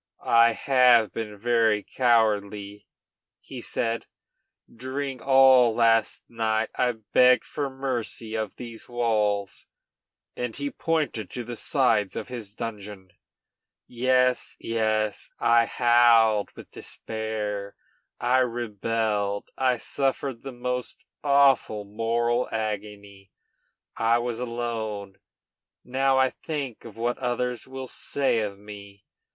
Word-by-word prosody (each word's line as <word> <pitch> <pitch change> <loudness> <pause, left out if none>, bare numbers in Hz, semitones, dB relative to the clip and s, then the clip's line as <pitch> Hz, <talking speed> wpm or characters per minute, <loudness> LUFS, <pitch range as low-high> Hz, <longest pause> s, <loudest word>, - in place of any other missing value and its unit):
"I 115 0 +5
have 125 -4 +4
been 105 -2 -5
very 110 -1 +2
cowardly," 105 -4 0 0.5
he - - -9
said. 115 0 -2 0.7
"During 130 +2 -4
all 130 -3 +6
last 115 -1 +2
night 110 -1 -1
I 125 -1 +1
begged 125 +3 +3
for 145 -2 -3
mercy 125 -4 -4
of 110 -2 -3
these 115 -2 -9
walls," 105 -5 -1 0.7
and 125 -2 -4
he 140 0 -3
pointed 155 - -2
to 125 - -5
the 120 +1 -7
sides 115 -6 +1
of - - -5
his 110 -5 -8
dungeon. 105 -5 -7 0.7
"Yes, 125 +1 +1
yes, 110 -2 -1
I 115 0 +4
howled 115 -2 +4
with - - -12
despair, 105 -2 -5 0.4
I 125 +2 +3
rebelled, 110 -4 -1
I 130 -2 +1
suffered 135 -1 -2
the 135 - -7
most 125 0 -4 0.3
awful 140 -7 +3
moral 115 +3 0
agony 105 -2 -5 0.7
I 115 +1 +3
was 120 -1 -3
alone! 115 -5 -4 0.6
Now 135 +1 +1
I 130 0 +3
think 140 -8 -6
of 115 -2 -11
what 120 +2 -1
others 125 -1 -2
will 130 0 -7
say 135 -2 -1
of 100 -2 -3
me. 100 -1 -12
115 Hz, 110 wpm, -25 LUFS, 105-125 Hz, 0.7 s, all